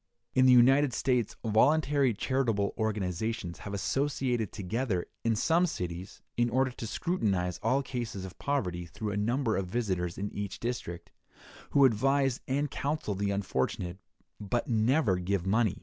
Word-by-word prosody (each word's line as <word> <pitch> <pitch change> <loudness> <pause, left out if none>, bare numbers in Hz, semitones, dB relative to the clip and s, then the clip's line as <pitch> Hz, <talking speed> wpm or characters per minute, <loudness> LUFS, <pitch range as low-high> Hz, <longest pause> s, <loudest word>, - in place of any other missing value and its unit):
In 130 0 +5
the - - +7
United 130 +2 +6
States 125 -3 0
voluntary 140 +4 +3
charitable 115 -5 0
organizations 105 -2 -2
have 100 - -7
associated 125 -1 0
together, 105 -1 -2 0.2
in 115 -1 +2
some 170 +10 +3
cities, 90 - -6
in 120 0 +2
order 130 +2 +2
to 120 -2 -6
scrutinize 100 - -1
all 130 +5 +2
cases 120 -8 -4
of 90 - -10
poverty 90 -12 -1
through 105 +6 -4
a - - -3
number 115 +3 +1
of 95 -2 -2
visitors 90 -5 -2
in 100 +1 -4
each 100 -2 -5
district, 85 -8 -4 0.6
who 140 -1 +5
advise 135 +2 +2
and 140 +1 0
counsel 145 -7 -2
the 100 +1 -1
unfortunate, 90 -1 -2 0.4
but 105 +4 -2
never 115 - +2
give 95 0 -1
money. 105 0 +2
110 Hz, 150 wpm, -30 LUFS, 95-130 Hz, 0.6 s, the